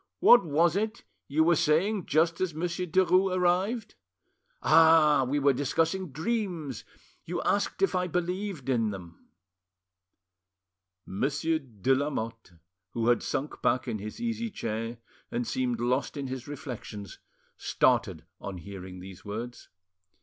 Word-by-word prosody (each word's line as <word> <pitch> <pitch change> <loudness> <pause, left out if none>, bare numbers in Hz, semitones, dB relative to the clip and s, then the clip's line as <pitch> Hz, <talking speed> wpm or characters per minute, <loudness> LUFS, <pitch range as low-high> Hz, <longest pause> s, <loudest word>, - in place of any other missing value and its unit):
What 240 -4 +8
was 165 +1 +2
it 220 +3 -2 0.2
you 155 +3 +2
were 170 +1 +4
saying 180 +7 +1
just 165 +3 +2
as 180 -4 -1
Monsieur 175 +2 -2
Derues 185 +2 +3
arrived?... 190 +6 +1 0.7
Ah! 155 -4 +6
we 145 - +1
were 140 -1 +4
discussing 160 +6 0
dreams, 165 - -3 0.4
you 175 +1 -3
asked 200 -1 0
if 195 - +3
I 180 0 0
believed 180 -2 -3
in 115 -5 +1
them." 90 -4 -10 1.8
Monsieur, 145 +9 0
de 130 -2 -1
Lamotte, 115 -8 -3 0.4
who 115 0 +1
had 120 - +3
sunk 145 +3 -3
back 130 +1 +1
in 110 -3 -2
his 105 +2 -7
easy 230 -1 -2
chair 115 - -4 0.3
and 120 0 -2
seemed 125 -2 -1
lost 125 +5 0
in 140 - -3
his 130 0 -6
reflections, 120 -8 -7 0.4
started - - +1
on 95 -2 -6
hearing 90 0 -9
these 95 -1 -11
words. 115 +4 -7
150 Hz, 135 wpm, -28 LUFS, 120-180 Hz, 1.8 s, What